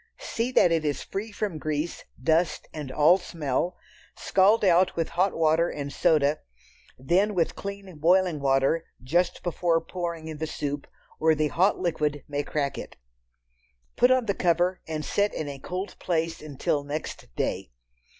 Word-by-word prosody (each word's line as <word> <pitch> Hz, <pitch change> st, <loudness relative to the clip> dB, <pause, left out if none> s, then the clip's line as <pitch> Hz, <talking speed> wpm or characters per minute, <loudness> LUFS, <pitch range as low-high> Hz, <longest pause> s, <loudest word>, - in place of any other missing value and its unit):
See 235 Hz, +2 st, -3 dB
that 175 Hz, -, +5 dB
it 165 Hz, -1 st, +2 dB
is 145 Hz, -2 st, -1 dB
free 210 Hz, +3 st, -5 dB
from 205 Hz, -6 st, -3 dB
grease, 155 Hz, +2 st, -3 dB
dust 160 Hz, 0 st, +1 dB
and 150 Hz, -4 st, -6 dB
all 155 Hz, +7 st, +5 dB
smell, 165 Hz, 0 st, -2 dB, 0.4 s
scald 200 Hz, +3 st, +3 dB
out 180 Hz, 0 st, +4 dB
with 165 Hz, -1 st, -1 dB
hot 185 Hz, +3 st, +1 dB
water 165 Hz, +1 st, +3 dB
and 140 Hz, -1 st, -5 dB
soda, 155 Hz, -3 st, +3 dB, 0.6 s
then 185 Hz, +10 st, +1 dB
with 170 Hz, -3 st, +1 dB
clean 200 Hz, -3 st, -7 dB
boiling 175 Hz, 0 st, +3 dB
water 135 Hz, +4 st, +2 dB, 0.2 s
just 175 Hz, +8 st, 0 dB
before 175 Hz, -1 st, +1 dB
pouring 170 Hz, -1 st, -5 dB
in 155 Hz, -2 st, -7 dB
the 160 Hz, -, -2 dB
soup, 145 Hz, -2 st, -4 dB, 0.3 s
or 160 Hz, 0 st, +4 dB
the 155 Hz, 0 st, +1 dB
hot 185 Hz, +7 st, +2 dB
liquid 150 Hz, -5 st, -1 dB
may 145 Hz, 0 st, -1 dB
crack 145 Hz, -1 st, -2 dB
it. -, -, -9 dB, 1.0 s
Put 245 Hz, -, +5 dB
on 255 Hz, -2 st, +3 dB
the 200 Hz, -, +1 dB
cover 180 Hz, +1 st, +1 dB
and 155 Hz, -1 st, -4 dB
set 205 Hz, 0 st, 0 dB
in 155 Hz, -, -3 dB
a 140 Hz, -1 st, -6 dB
cold 185 Hz, +7 st, -5 dB
place 165 Hz, -2 st, -1 dB
until 145 Hz, -1 st, -2 dB
next 145 Hz, +2 st, -5 dB
day. -, -, -2 dB
165 Hz, 160 wpm, -26 LUFS, 150-185 Hz, 1.0 s, that